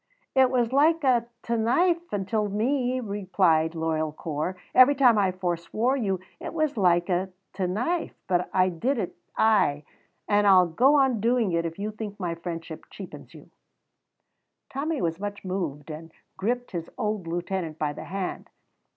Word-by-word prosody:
"It 265 -1 +5
was 245 -1 +1
like 315 +3 +4
a 245 -3 +3 0.2
t' 235 - -1
knife 340 +10 +1
intil 205 +1 -1
me," 250 +4 0
replied 185 -7 +1
loyal 160 -1 -1
Corp; 155 +4 -4 0.2
"every 255 +3 +7
time 245 -5 +5
I 190 -2 +2
forswore 185 +7 -1
you 195 -8 -1 0.2
it - - -7
was 310 -3 0
like 175 -4 +3
a 185 +1 0 0.2
t' 185 -1 -1
knife, 245 - -2
but 180 -1 +1
I 185 0 +3
did 240 +11 -1
it, 195 -6 -3 0.2
ay, 205 -10 +3 0.4
and 205 0 +3
I'll 185 -2 +7
go 250 - +3
on 265 -5 +3
doing 235 -3 +2
it 170 0 0
if 165 - -8
you 210 +2 -3
think 210 -1 -7
my 175 -3 -2
friendship 165 -1 -7
cheapens - - -10
you." - - -15 1.2
Tommy 295 +2 -2
was 165 0 -1
much 205 -1 -5
moved, 165 -6 -4
and 160 +2 -9 0.2
gripped 245 +5 -2
his 170 -2 -5
old 210 -4 -2
lieutenant 175 -1 -3
by 150 -2 -1
the - - -8
hand. 190 0 -5
200 Hz, 165 wpm, -26 LUFS, 175-245 Hz, 1.2 s, every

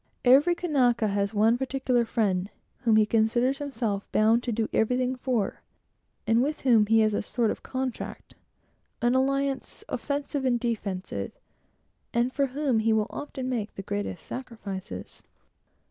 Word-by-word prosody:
Every 285 +8 +6
Kanaka 250 -10 +2
has 200 0 0
one 225 +3 +3
particular 260 -2 +1
friend, 200 -5 0 0.3
whom 230 -3 +3
he 215 -1 +5
considers 235 +5 +2
himself 235 -8 -3
bound 220 +2 +4
to 245 - -3
do 225 0 0
everything 250 +3 +1
for, 250 -5 -1 0.6
and 230 +1 +3
with 295 +3 -1
whom 230 -5 +4
he 225 +1 +5
has 215 -1 +2
a - - 0
sort 230 +1 0
of - - -6
contract, 260 -2 -5 0.7
an 240 +1 +4
alliance 275 +1 0
offensive 285 -1 -3
and 245 -2 +2
defensive, 195 - -3 0.8
and 240 +2 +2
for 280 -2 +1
whom 265 -3 0
he 225 +1 +2
will 220 0 0
often 275 -3 -5
make 230 -5 -3
the 195 - -6
greatest 205 -4 -4
sacrifices. 200 - -7
235 Hz, 145 wpm, -27 LUFS, 215-260 Hz, 0.8 s, Every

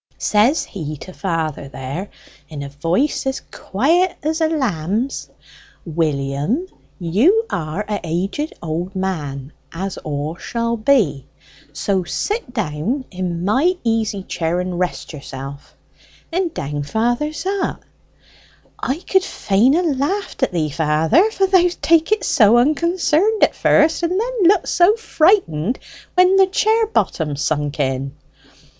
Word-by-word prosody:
Says 220 +9 +3
he 155 -6 -6
to 185 +6 -10
father 160 -7 -3
there, 135 +8 -6 0.4
in 145 -3 -6
a 140 - -6
voice 170 - 0
as 265 - -2
quiet 330 - +1
as 315 +2 -1
a 320 - +4
lamb's, 235 - -1 0.6
'William, 155 - -1 0.3
you 250 - +3
are 165 +5 -3
a' 210 -1 -2 0.6
old 165 +2 -2
aged 195 - -27
man, 150 -7 -3 0.2
as 190 +3 -4
all 150 +1 -4
shall 235 +3 -2
be, 215 - +2 0.4
so 185 +6 -1
sit 415 - -3
down 215 - -2
in 180 -2 -3
my 290 - +2
easy 220 -4 0
chair, 170 -1 -2
and 180 -1 -3
rest 180 -2 -3
yourself.' 140 -1 -9 0.5
And 350 0 0
down 145 - -4
father 235 - 0
zot. 380 +6 -3 1.0
I 265 - -1
could 380 -1 +3
fain 220 - +2
ha' 350 +3 +2
laughed 320 +8 -1
at 265 - +2
thee, 155 -4 -1
father; 160 - +3
for 390 -3 +1
thou'st 360 -2 +3
take 330 +2 +3
it 430 - +2
so 220 0 +5
unconcerned 335 - +2
at - - +4
first, 320 +2 +3
and 350 +3 0
then 475 -2 -1
looked 380 +2 +4
so 355 +5 +4
frightened 310 - +2 0.4
when 365 +1 +5
the 385 -1 +6
chair 440 +3 +2
bottom 160 - -1
sunk 150 0 -1
in." 135 0 -1
210 Hz, 135 wpm, -19 LUFS, -, 1.0 s, the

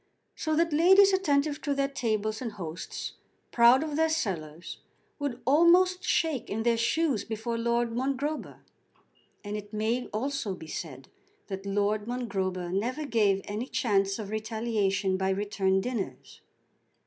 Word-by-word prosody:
So 315 0 -1
that 335 0 +2
ladies 380 +5 +6
attentive 300 -5 +1
to 285 -1 -1
their 275 0 +1
tables 220 -5 -2
and 230 -4 -4
hosts 170 -5 -6 0.4
proud 240 +4 +6
of 305 -2 -4
their 320 +1 +2
cellars 170 - -3 0.4
would 280 -4 -3
almost 350 +6 +5
shake 315 -7 0
in 220 +2 -2
their 235 0 +3
shoes 260 +2 +1
before 225 +1 -4
Lord 235 0 0
Mongrober. 275 +5 -3 0.8
And 205 0 -4
it 205 -1 -7
may 225 +4 -1
also 235 -3 -3
be 160 - -10
said 145 -4 -7 0.4
that 195 0 -5
Lord 205 +2 0
Mongrober 190 -7 -2
never 250 +10 -1
gave 210 -6 +2
any 215 +5 -4
chance 195 -8 +1
of 210 -3 -6
retaliation 215 -3 0
by 190 0 0
return 195 -1 +1
dinners. 230 -3 -5
230 Hz, 140 wpm, -28 LUFS, 200-280 Hz, 0.8 s, ladies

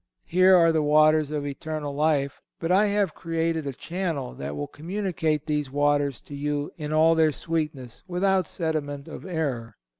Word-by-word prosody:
Here 185 +2 +5
are 165 -2 +6
the 160 -1 +2
waters 155 0 +4
of 150 -1 -3
eternal 145 +1 -4
life, 145 -2 0 0.2
but 165 +1 -1
I 200 +3 +5
have 200 -5 +1
created 165 -2 -2
a 140 - -3
channel 165 -4 -4
that 70 +1 -6
will 75 0 -3
communicate 160 - -2
these 150 -3 -1
waters 145 -1 +1
to 145 - -10
you 145 0 -2
in 150 -2 -5
all 160 +1 +5
their 160 -1 +3
sweetness 150 -6 -4
without 185 -1 +1
sediment 145 -4 -3
of - - -9
error. 135 - -3
155 Hz, 170 wpm, -25 LUFS, 145-165 Hz, 0.2 s, are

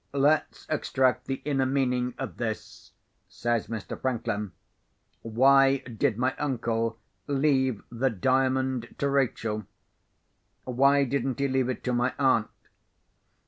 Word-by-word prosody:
"Let's 145 +2 +1
extract 130 -4 +1
the 135 - -4
inner 135 -3 +1
meaning 125 -2 0
of - - -6
this," 110 -2 -5 0.4
says 120 -2 -1
Mr. 110 0 -6
Franklin. 115 -6 -2 0.7
"Why 135 +4 +4
did 115 -4 -2
my 130 +2 0
uncle 115 -5 -1 0.3
leave 135 -5 +1
the 125 +3 +1
Diamond 130 +2 0
to 140 - 0
Rachel? 115 -6 -1 1.0
Why 140 +3 +3
didn't 135 -1 -1
he 140 0 +1
leave 130 -1 0
it 130 - -4
to 125 - -1
my 120 +1 0
aunt?" 130 -6 +2
130 Hz, 120 wpm, -27 LUFS, 120-135 Hz, 1.0 s, Why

